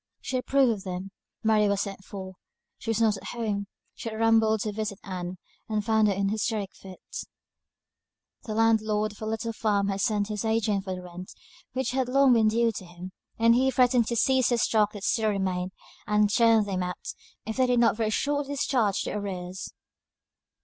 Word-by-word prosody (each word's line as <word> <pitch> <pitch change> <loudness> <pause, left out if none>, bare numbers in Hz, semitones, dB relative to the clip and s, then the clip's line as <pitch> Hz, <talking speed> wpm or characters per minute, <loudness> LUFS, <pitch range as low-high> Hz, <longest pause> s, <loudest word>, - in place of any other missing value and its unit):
She 260 - -3
approved 265 0 +3
of 205 -4 -4
them; 185 +1 -5 0.3
Mary 215 -1 +4
was 200 0 +1
sent 195 -1 -5
for; 190 -1 -8 0.5
she 225 - -6
was 225 - +1
not 220 -3 +3
at - - -12
home; 210 -4 -2 0.3
she 230 - -6
had 220 - -6
rambled 225 -1 +3
to 215 - -2
visit 210 -1 -3
Ann, 180 -1 -5 0.3
and 215 -1 -1
found 220 -1 +3
her 200 - +2
in 200 - -2
an 195 - +1
hysteric 215 -1 -1
fit. 190 -1 -12 1.5
The 215 - -4
landlord 215 -1 +2
of 205 - -15
her 215 - -4
little 225 +1 -2
farm 205 -2 +1
had 195 0 -1
sent 210 -2 +1
his 210 -1 -3
agent 220 -3 0
for 190 -1 -3
the 180 - -8
rent, 180 +1 -9 0.4
which 260 +1 -1
had 255 -1 0
long 270 0 +5
been 225 -2 +4
due 230 +1 +2
to 195 - -8
him; 175 +2 -9 0.3
and 230 +1 +5
he 260 +2 +3
threatened 250 -3 +3
to 235 - -1
seize 260 +2 +3
the 240 - +2
stock 215 -2 +2
that 205 -2 -8
still 220 0 +2
remained, 185 -2 -1 0.4
and 210 -1 +3
turn 230 -2 +5
them 190 -2 -2
out, 180 0 -4 0.3
if 220 +2 -4
they 260 -1 +3
did 245 -1 +3
not 235 -1 +4
very 220 -1 0
shortly 285 +4 -1
discharge 240 -8 +1
the - - -4
arrears. 190 -2 -5
215 Hz, 200 wpm, -27 LUFS, 200-230 Hz, 1.5 s, long